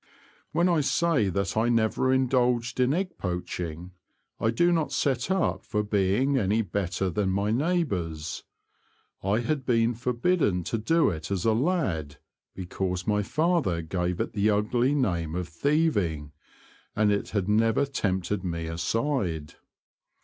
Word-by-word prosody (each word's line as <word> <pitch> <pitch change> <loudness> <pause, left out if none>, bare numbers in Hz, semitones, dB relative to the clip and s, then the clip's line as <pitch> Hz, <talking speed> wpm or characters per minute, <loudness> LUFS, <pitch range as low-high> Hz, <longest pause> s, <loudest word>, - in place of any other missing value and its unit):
When 170 +1 +2
I 170 -4 +3
say 145 - +2
that 95 0 -2
I 115 +2 +2
never 115 +2 +2
indulged 125 -2 +1
in 125 0 +3
Qgg 180 +4 -2
poaching 90 -1 -4 0.5
I 110 - +1
do 175 +10 +3
not 165 -3 0
set 130 -1 0
up 175 - 0
for 105 -2 -1
being 105 +7 +1
any 105 +2 +1
better 95 -1 -2
than 100 +1 0
my 100 +2 0
neighbours. 105 - -1 0.8
I 100 +4 +1
had 135 +3 -1
been 120 -2 +2
forbidden 120 - 0
to 115 - -2
do 165 +9 +2
it 80 -1 -6
as 95 -3 -2
a 110 - +4
lad 110 - -1 0.4
because 90 0 -3
my 105 -1 +1
father 150 - 0
give 90 +1 -2
it - - -2
the 105 0 +2
ugly 120 +6 +1
name 85 - -1
of 90 -1 -3
thieving, 90 - 0 0.6
and 105 -1 +3
it 100 - -1
had 100 -3 -1
never 115 +5 +3
tempted 95 -7 -2
me 85 -2 -3
aside. 85 - -2
105 Hz, 145 wpm, -27 LUFS, 90-130 Hz, 0.8 s, a